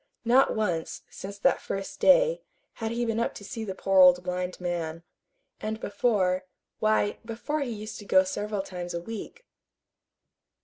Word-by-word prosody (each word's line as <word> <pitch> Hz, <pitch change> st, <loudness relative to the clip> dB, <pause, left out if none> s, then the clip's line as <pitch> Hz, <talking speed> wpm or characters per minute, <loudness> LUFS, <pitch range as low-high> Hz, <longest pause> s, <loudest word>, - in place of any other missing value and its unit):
Not 255 Hz, +3 st, +4 dB
once, 180 Hz, -7 st, -2 dB
since 200 Hz, +1 st, -8 dB
that 200 Hz, -, +2 dB
first 195 Hz, 0 st, -5 dB
day, -, -, +5 dB, 0.4 s
had 220 Hz, -, -1 dB
he 235 Hz, +1 st, -1 dB
been 225 Hz, -1 st, 0 dB
up 235 Hz, -, -1 dB
to -, -, -9 dB
see 220 Hz, +3 st, -5 dB
the 190 Hz, -3 st, -5 dB
poor 195 Hz, 0 st, +2 dB
old 180 Hz, -1 st, +7 dB
blind 180 Hz, 0 st, -3 dB
man. 170 Hz, -2 st, -3 dB, 0.6 s
And 220 Hz, +1 st, -3 dB
before 200 Hz, -4 st, +1 dB, 0.3 s
why, 215 Hz, -1 st, +2 dB
before 235 Hz, +7 st, -3 dB
he 275 Hz, -, -2 dB
used 215 Hz, -1 st, -6 dB
to 205 Hz, -, -10 dB
go 190 Hz, -1 st, +5 dB
several 205 Hz, +1 st, -3 dB
times 175 Hz, -2 st, -6 dB
a -, -, -1 dB
week. 225 Hz, -, -8 dB
205 Hz, 165 wpm, -27 LUFS, 180-225 Hz, 0.6 s, old